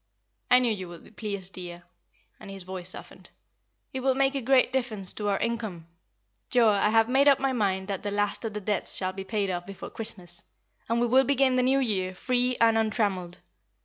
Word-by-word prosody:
"I 250 - +8
knew 245 -3 +2
you 190 -3 -6
would 170 -1 -11
be - - -17
pleased, 200 -4 -5
dear;" 175 -1 -7 0.6
and - - -11
his 195 -1 -7
voice 185 -1 -6
softened. - - -10 0.6
"It 265 - -2
will 260 0 +1
make 270 0 +2
a 275 - -2
great 255 +1 +3
difference 220 -8 -1
to 210 -1 -2
our 200 - +1
income. 220 -8 -3 0.6
Joa, 235 -4 +5
I 210 - +3
have 225 0 +4
made 270 +3 +4
up 275 -1 +6
my 270 -1 0
mind 190 -5 0
that 195 -2 -2
the 205 - -3
last 205 +2 -1
of 220 -2 -4
the 210 - -3
debts 205 -1 -2
shall 185 -1 -2
be 195 0 -6
paid 200 -1 -1
off 175 0 -4
before 195 -1 -8
Christmas, 180 -6 -6 0.5
and 230 +1 +2
we 240 - +3
will 255 +3 +5
begin 270 0 +3
the 255 - +3
New 260 +2 +3
Year 190 -8 0
free 250 +3 0
and 225 -1 +4
untrammelled. 205 -5 -1
215 Hz, 210 wpm, -27 LUFS, 190-250 Hz, 0.6 s, I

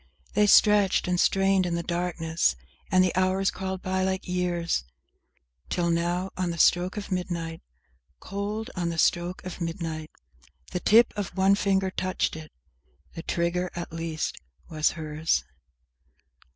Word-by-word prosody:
They 210 0 +4
stretched 205 -3 +5
and 180 -1 +1
strained 195 -1 +3
in 170 - -1
the 170 - -2
darkness, 170 - 0 0.3
and 185 0 +5
the 185 - 0
hours 185 +1 +2
crawled 190 0 -5
by 185 0 0
like 190 0 -2
years, 175 - -1 0.9
Till, 170 -1 0
now, 175 +3 0
on 185 -1 -1
the 170 - -4
stroke 180 +4 +3
of 205 -1 -6
midnight, 170 -3 -3 0.6
Cold, 210 +4 -4
on 175 -2 -1
the 165 - -4
stroke 175 +2 +1
of 185 0 -7
midnight, 165 -2 -4 0.6
The 180 - -2
tip 230 +6 +5
of 195 -3 -5
one 190 +1 +5
finger 195 -1 +1
touched 185 -2 -1
it! 155 -1 -9 0.6
The 165 - -6
trigger 175 +2 -1
at 175 -2 -6
least 165 -1 -3 0.3
was 155 -1 +1
hers! 155 0 -1
180 Hz, 145 wpm, -26 LUFS, 170-190 Hz, 0.9 s, stretched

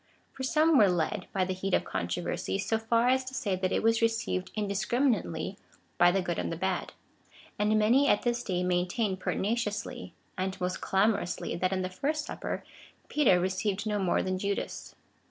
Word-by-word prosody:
For - - -9
some 305 +3 +4
were 205 -3 +6
led, 180 +3 -1
by 190 -1 +1
the 185 - -2
heat 185 +1 0
of - - +1
controversy, 175 +2 -2
so 220 +3 0
far 230 +2 +2
as 260 0 +3
to 260 +1 -7
say, 205 -7 0
that 185 0 -1
it - - 0
was 225 0 +3
received 225 -5 0
indiscriminately 205 - 0 0.4
by 175 - +7
the 190 0 0
good 175 -1 -2
and - - -2
the 165 - -3
bad; 185 0 -2 0.7
and 210 +1 +3
many 240 +7 +4
at 205 - +3
this 240 0 0
day 180 -6 -1
maintain 180 +3 0
pertinaciously, 205 +2 -2 0.2
and 190 +1 -2
most 180 0 -2
clamor 200 +2 +2
ously, 175 - -4
that 185 +2 0
in 185 -1 0
the - - -1
first 295 +9 -2
Supper - - -4 0.5
Peter 250 -12 +4
received 190 +3 -1
no 210 -1 0
more 185 -3 +1
than 185 0 -2
Judas. 200 +1 -3
200 Hz, 185 wpm, -29 LUFS, 185-230 Hz, 0.7 s, by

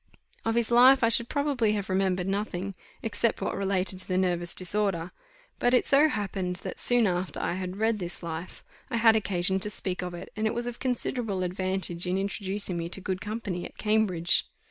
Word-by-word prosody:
Of 225 0 +1
his 235 0 +1
life 255 +2 +7
I 230 - +5
should 230 +1 +2
probably 280 -7 +1
have 205 -2 -2
remembered 185 -1 0
nothing, 195 -1 -2 0.3
except 225 0 0
what - - -2
related 190 -1 0
to - - +1
the 185 - 0
nervous 175 -2 0
disorder; 185 -2 0 0.5
but 245 +1 +3
it - - +3
so 290 +3 +5
happened, 195 -6 -2
that, - - -6
soon 245 -2 +3
after 180 -1 -1
I - - -1
had 185 +1 -4
read 220 0 +1
this 175 -1 -6
life, 165 +1 -6 0.3
I 235 - -1
had 225 -1 +6
occasion 190 -3 +1
to 210 - 0
speak 185 -3 -3
of 180 -1 -5
it, 175 +2 -9
and 215 +1 0
it 220 - -2
was 240 0 -1
of 240 -1 -5
considerable 240 -6 -1
advantage 185 -1 -2
in 180 +1 +1
introducing 195 -1 -2
me 170 0 -3
to 185 - -2
good 190 0 -3
company 205 -4 -4
at - - -9
Cambridge. 210 -6 +2
195 Hz, 200 wpm, -28 LUFS, 180-225 Hz, 0.5 s, life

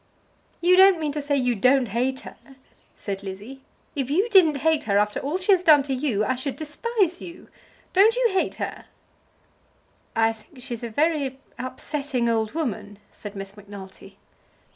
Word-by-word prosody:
"You 360 +1 +5
don't 380 -2 +7
mean 305 -2 -1
to 295 +1 -3
say 285 0 0
you 250 -2 +1
don't 250 +3 +3
hate 255 +5 -1
her?" - - -11 0.6
said 195 -1 -5
Lizzie. 205 +8 -8 0.3
"If 270 -3 -2
you 380 +11 +1
didn't 325 - +5
hate 320 -2 +2
her 200 -2 +2
after 210 0 +1
all 295 +6 -2
she 375 +2 +1
has 375 -3 +5
done 305 -5 +6
to 270 -1 -3
you, 250 -6 0
I 255 - +1
should 260 +2 -3
despise 360 +4 -1
you. 345 0 -11 0.4
Don't 420 +5 +5
you - - +2
hate 380 -1 0
her?" - - -6 1.3
"I 225 0 +3
think 245 +4 -16
she's 235 -3 -5
a 235 - -4
very 285 +1 0 0.2
upsetting 255 0 -2
old 220 -2 0
woman," 225 -10 -4
said 205 -1 -9
Miss 195 0 -8
Macnulty. 200 -2 -12
270 Hz, 170 wpm, -24 LUFS, 225-320 Hz, 1.3 s, don't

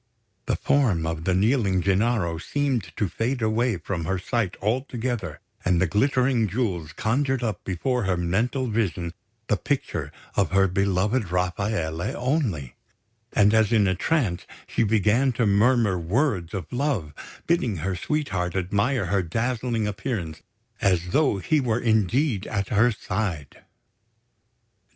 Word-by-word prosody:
The - - +1
form 110 - +2
of 80 0 -3
the 95 - +2
kneeling 100 -3 +2
Gennaro 100 -4 +1
seemed 130 - -1
to 105 - +1
fade 115 +7 -2
away 110 0 +1
from 85 0 -4
her 95 +3 0
sight 105 +1 -2
altogether, 120 - -2 0.2
and 90 -1 +2
the 95 - +3
glittering 125 - +2
jewels 90 -7 -2
conjured 130 +3 0
up 110 -6 -2
before 120 +6 -1
her 95 -1 +1
mental 110 +10 0
vision 95 -7 -1 0.3
the 105 - +1
picture 140 +7 -2 0.2
of - - +2
her 95 0 +5
beloved 100 +3 +1
Rafaele 90 -2 -1
only; 120 - -1 0.6
and, 105 0 +4
as 110 0 +3
in 105 -4 +4
a 95 - +2
trance, 100 - 0 0.2
she - - -1
began 110 +4 +3
to 115 0 +1
murmur 105 -1 +3
words 95 - 0
of 85 -5 -6
love, 125 - -1 0.3
bidding 130 - +1
her 95 +4 -2
sweetheart 95 - -2
admire 100 +5 0
her 95 +2 +1
dazzling 115 +5 -1
appearance, 100 - -4 0.4
as 90 -3 +2
though 140 - +2
he 150 - +1
were 120 -3 0
indeed 110 - +1
at 100 -3 -2
her 115 +4 +4
side. 95 -8 -4
105 Hz, 140 wpm, -25 LUFS, 90-125 Hz, 0.6 s, her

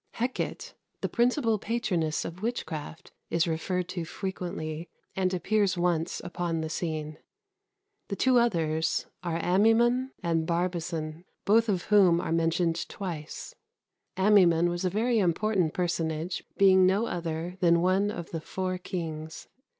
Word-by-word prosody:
Hecate, 245 +2 -3 0.3
the - - 0
principal 240 -2 +2
patroness 185 -9 -1
of 170 +3 -7
witchcraft, 165 -9 -5 0.2
is 165 +1 +1
referred 175 +2 -1
to 175 - -3
frequently, 165 -3 -5 0.3
and 185 -1 +1
appears 195 +1 +1
once 175 -1 0
upon 175 -2 -2
the 160 0 -4
scene. 155 -3 -3 0.9
The 200 - -3
two 255 +4 +4
others 165 -8 +1 0.2
are 170 -2 -2
Amaimon 225 +8 +3
and 165 -2 0
Barbazon, 170 -2 -2 0.2
both 225 +2 +4
of 185 -4 0
whom 190 -5 +5
are - - -3
mentioned 165 +1 +1
twice. 165 -6 -6 0.6
Amaimon 180 -4 +5
was 175 +1 -3
a 185 - +2
very 225 +4 +1
important 185 -2 +1
personage, 165 -1 -2
being 190 -1 +6
no 200 +5 +2
other 170 -1 -4
than 170 -2 +4
one 190 +3 +2
of 175 -5 -6
the 165 - -4
four 185 +2 -3
kings. 160 -3 -6
175 Hz, 135 wpm, -28 LUFS, 165-200 Hz, 0.9 s, being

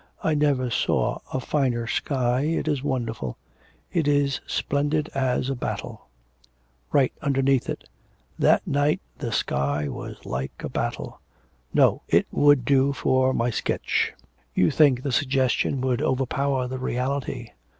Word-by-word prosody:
I 160 - +2
never 140 -4 +1
saw - - +1
a 130 - -1
finer 125 -3 0
sky, 125 0 0
it 160 0 -1
is 145 -4 0
wonderful. 115 - -3 0.6
It 160 -4 +1
is 145 -2 +2
splendid 145 +2 0
as 130 -2 0
a 135 - 0
battle'... 125 - -5 0.8
'Write 135 -3 +3
underneath 135 -2 +1
it, - - -5 0.5
"That - - +4
night 145 +4 +1 0.2
the 120 -6 -3
sky 70 -5 0
was - - -7
like 65 +2 -3
a - - -3
battle."' - - -4 0.5
'No, - - +4
it - - +3
would 145 -4 +4
do 140 +1 +3
for 130 -1 +2
my 120 -1 0
sketch.' - - 0 0.4
'You 90 - +4
think 135 -5 +4
the 140 - -1
suggestion 130 0 +1
would 130 0 0
overpower 135 -1 0
the 130 +1 -5
reality.... 130 -1 -2
130 Hz, 140 wpm, -25 LUFS, 125-140 Hz, 0.8 s, That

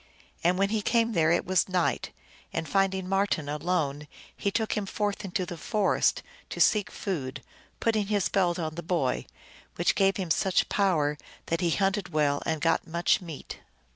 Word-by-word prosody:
And 175 +2 +3
when 195 +1 +2
he 220 0 0
came 230 +2 +2
there 165 -6 +3
it 170 - +2
was 185 0 +2
night, 180 -2 0 0.4
and, 165 -1 -3
finding 190 +2 +1
Marten 195 -6 0
alone, 150 -1 -1 0.3
he 200 - -1
took 220 +2 -1
him 205 -2 -2
forth 205 +1 -2
into 185 -1 -2
the 175 -1 -7
forest 210 +1 +1 0.3
to - - -6
seek 210 -3 +4
food, 150 -11 -4 0.4
putting 215 -3 +1
his 205 -2 +1
belt 180 -3 +1
on 160 -3 -3
the 170 - -5
boy, 165 -6 -1 0.5
which - - +2
gave 195 0 +2
him 185 -4 -3
such 190 +3 +2
power 155 -7 +1 0.3
that 165 +2 -1
he 175 - +2
hunted 195 +1 0
well 150 -3 +1
and 160 -1 -1
got 165 0 +1
maich 170 +3 +2
meat. 165 -5 -8
180 Hz, 175 wpm, -28 LUFS, 160-195 Hz, 0.5 s, seek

